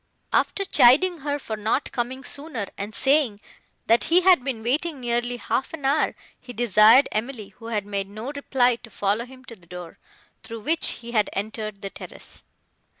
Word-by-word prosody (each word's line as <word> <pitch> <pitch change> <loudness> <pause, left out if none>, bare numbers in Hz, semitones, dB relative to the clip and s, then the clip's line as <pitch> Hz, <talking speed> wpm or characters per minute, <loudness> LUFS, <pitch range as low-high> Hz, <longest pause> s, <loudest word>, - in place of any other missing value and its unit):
After 395 - +1
chiding 345 +4 +5
her 285 0 -2
for 225 -6 -5
not 215 +6 -1
coming 255 +2 -3
sooner, 280 -8 -6
and 205 +1 -6
saying 270 -6 +2 0.5
that 230 +1 +3
he 345 +3 +4
had 365 -7 +5
been 250 -5 -4
waiting 290 +5 -1
nearly 240 0 -1
half 265 +5 -2
an 290 -4 -9
hour, 285 +3 +2 0.2
he 250 - -10
desired 225 +3 +6
Emily, 220 -2 -4
who 225 +3 -11
made 200 -1 -4
no 215 +6 -6
reply, 255 -4 +1
to 230 - -15
follow 205 +3 -1
him 260 0 -15
to 230 - -11
the 175 -5 -23
door 180 -1 -10 0.4
through 225 0 -8
which 325 +8 +1 0.2
he 235 - -6
had 215 -3 +2
entered 215 0 -5
the 195 - -5
terrace. - - -11
240 Hz, 175 wpm, -24 LUFS, 215-275 Hz, 0.5 s, desired